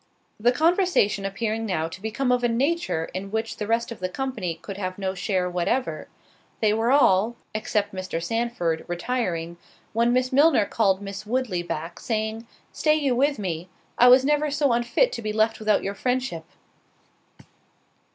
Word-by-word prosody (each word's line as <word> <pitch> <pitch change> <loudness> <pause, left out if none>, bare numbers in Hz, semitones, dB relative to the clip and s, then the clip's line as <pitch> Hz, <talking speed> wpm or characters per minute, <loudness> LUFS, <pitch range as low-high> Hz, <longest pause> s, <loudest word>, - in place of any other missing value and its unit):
The 240 +3 +4
conversation 320 - +2
appearing 220 +3 -2
now 180 -7 -1
to 185 +3 -10
become 245 +4 -1
of 250 0 +2
a - - +4
nature 255 - 0
in 190 +2 -5
which 220 +2 -3
the 210 - -4
rest 230 +1 0
of 230 - -7
the 185 0 -2
company 215 -8 -3
could 190 +4 -9
have 185 -2 -4
no 190 -1 -2
share 185 -1 -1
whatever, 180 +9 -1 0.5
they 215 -1 +3
were 225 +3 +1
all, 230 -5 +4 0.2
except 210 -1 -1
Mr. 185 -3 -4
Sandford, 175 -4 -1
retiring; 175 -3 -2 0.4
when 235 +2 +2
Miss 255 +1 +1
Milner 280 -6 +5
called 200 -2 +1
Miss 200 +1 -7
Woodley 235 -7 -1
back, 170 0 -5
saying, 220 0 -3 0.3
"Stay 305 -1 +2
you 280 -5 +1
with 280 +3 +2
me; 180 -3 -4 0.3
I 245 - +6
was 255 +1 +7
never 295 +1 +2
so 285 -2 +1
unfit 240 - +2
to 235 - -5
be 215 -1 -2
left 220 +1 +1
without 215 -1 +2
your 200 - -2
friendship." 250 -7 -2
220 Hz, 170 wpm, -25 LUFS, 190-250 Hz, 0.5 s, was